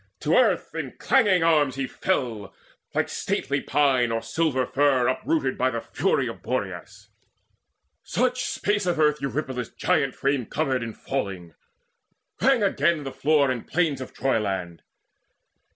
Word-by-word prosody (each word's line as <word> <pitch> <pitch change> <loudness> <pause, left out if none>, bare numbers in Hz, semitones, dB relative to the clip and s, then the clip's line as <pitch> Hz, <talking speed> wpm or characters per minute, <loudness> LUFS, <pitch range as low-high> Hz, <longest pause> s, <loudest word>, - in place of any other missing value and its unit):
To - - +1
earth - - +2
in - - -5
clanging 205 -10 +3
arms 150 -5 +3
He 135 0 -2
fell, 115 - -2 0.4
like - - +1
stately 140 0 -2
pine 130 -5 +2
or 115 0 -2
silver 130 +2 0
fir 130 -2 +2
Uprooted 310 - 0
by - - +3
the - - -3
fury - - 0
of - - -7
Boreas; - - -5 0.9
Such 255 0 0
space 205 -2 -1
of 175 -3 0
earth 150 -1 +3
Eurypylus' 130 -3 -3
giant 135 -2 0
frame 140 -4 0
Covered 135 -5 -1
in 115 -1 -5
falling: 95 - -4 0.9
rang 265 -5 +4
again 165 -4 +1
the 135 - -5
floor 145 -2 +2
And 120 -3 -5
plain 160 -6 0
of 130 - -7
Troyland. 95 -9 -2
135 Hz, 140 wpm, -25 LUFS, 125-160 Hz, 0.9 s, rang